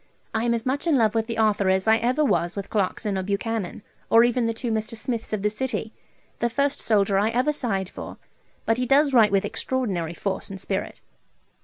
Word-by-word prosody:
I 225 +1 0
am 235 0 +2
as 230 - -4
much 280 +5 -1
in 310 -4 +4
love 220 -3 +3
with 225 -1 0
the 230 - -4
author 210 -3 +2
as 190 +2 +1
I 220 0 +6
ever 255 +6 +1
was 175 -9 +1
with 200 -1 -6
Clarkson 200 -1 -1
or - - -1
Buchanan, 200 +1 -3 0.3
or 230 +1 +7
even 240 -1 +2
the - - +1
two 235 0 -3
Mr. 220 +1 -2
Smiths 230 0 -4
of 210 -2 -2
the 210 - +3
city. 230 -1 -3 0.5
The 235 - +1
first 280 +4 0
soldier 200 -3 +2
I 210 +2 +2
ever 250 +6 +1
sighed 200 -9 -1
for; - - -9 0.5
but 225 +2 +1
he 250 - -1
does 280 +1 +4
write 225 -5 +6
with 195 -1 +2
extraordinary 190 -11 -2
force 195 +4 -3
and 195 -1 -7
spirit. 195 0 -4
225 Hz, 215 wpm, -24 LUFS, 200-245 Hz, 0.5 s, or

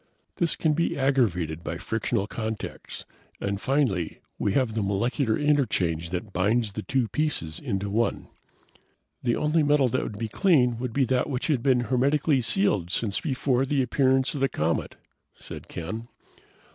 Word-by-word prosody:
"This 170 -2 +1
can 155 -2 +1
be 170 +3 0
aggravated 95 - +1
by 80 - -4
frictional 100 +1 -1
contacts, 110 0 -6 0.3
and 100 0 -2
finally 130 - 0 0.2
we 100 - +1
have 125 -3 +1
the 110 - -1
molecular 110 +4 0
interchange 95 - +1
that 95 +3 -5
binds 105 +3 +1
the 110 - -4
two 130 0 0
pieces 150 - -2
into 100 +1 -2
one." 110 +4 0 0.9
"The 120 -2 +1
only 155 +2 +2
metal 145 -3 +3
that 130 - 0
would 105 - -5
be 115 +1 -2
clean 125 - +3
would 125 -1 -3
be 135 +3 +2
that 125 +3 +1
which 130 -2 -2
had 145 -7 +1
been 130 -1 +3
hermetically 135 +4 +2
sealed 165 - +2
since 100 +1 -1
before 130 -3 +1
the 135 0 +1
appearance 130 +1 +2
of 145 - -3
the 135 - +3
comet," 80 +2 -1 0.4
said - - -9
Ken. 110 +8 -6
120 Hz, 160 wpm, -26 LUFS, 100-140 Hz, 0.9 s, metal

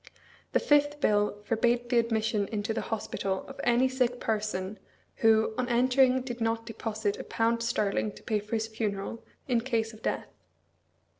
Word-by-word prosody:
The - - +4
fifth 290 0 +3
bill 205 -4 +1
forbade 240 +2 +1
the 240 - +5
admission 220 -3 0
into 210 +1 -2
the - - -2
hospital 195 -3 -2
of - - -8
any 245 +2 +4
sick 250 -1 0
person 210 -2 -2 0.4
who 220 -1 +4
on 250 0 0
entering 255 +1 +4
did 240 -2 -6
not 225 0 0
deposit 220 -2 -3
a - - -4
pound 230 +1 0
sterling 210 -2 0
to - - -14
pay 215 -1 0
for 210 +2 -4
his 220 0 0
funeral, 220 -1 -3 0.2
in 240 -3 +2
case 230 -3 -1
of 220 - -14
death. - - -1
225 Hz, 165 wpm, -29 LUFS, 215-240 Hz, 0.4 s, the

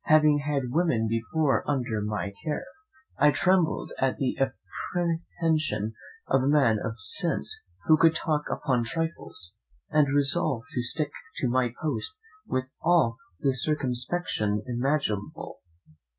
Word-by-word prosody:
Having 155 -1 +5
had 140 -4 -1
women 150 -7 +2
before 125 +6 +1
under 125 -6 0
my 105 -2 -3
care, 150 - -2 0.5
I 150 - +7
trembled 180 +2 +2
at 130 -1 +1
the 135 - 0 0.5
apprehension 165 - -1 0.3
of 135 - +3
a 130 - 0
man 135 -7 +4
of 115 0 -4
sense 100 - -1 0.3
who 155 - +6
could 165 +1 +5
talk 150 -2 0
upon 125 -5 0
trifles, 160 - -4 0.4
and 150 -2 +4
resolved 140 -3 +2
to 125 - -1
stick 145 +4 0 0.2
to 130 - 0
my 125 0 +1
post 160 - -2 0.3
with 130 +1 -2
all 160 -9 +3 0.2
the 135 -3 +2
circumspection 125 - 0
imaginable. 125 -4 -2
140 Hz, 125 wpm, -27 LUFS, 120-155 Hz, 0.5 s, I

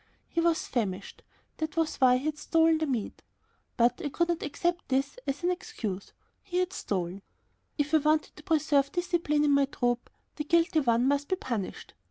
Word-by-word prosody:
He 335 - -1
was 335 -1 +2
famished, 200 -5 -3 0.4
that 315 0 -4
was 325 -1 0
why 250 -1 +5
he 260 - -6
had 310 -1 -1
stolen 325 +1 +3
the 315 - 0
meat. 240 -6 -3 0.6
But 240 0 +3
I 290 - -1
could 340 +4 0
not 340 -1 0
accept 345 +4 -2
this 275 - 0
as 275 +5 -2
an 355 - +3
excuse. 255 - -5 0.3
He 360 -2 -4
had 365 +1 0
stolen. 185 -1 -3 0.6
If 295 +1 -1
I - - +8
wanted 305 +1 +1
to - - -12
preserve 295 -3 +2
discipline 340 -4 +1
in 295 - +3
my 280 0 +4
troop, 245 -3 -1 0.3
the 300 - -2
guilty 330 +1 +3
one 240 -2 +2
must 285 +1 +1
be 375 - +1
punished. 235 - -5
295 Hz, 190 wpm, -29 LUFS, 255-330 Hz, 0.6 s, I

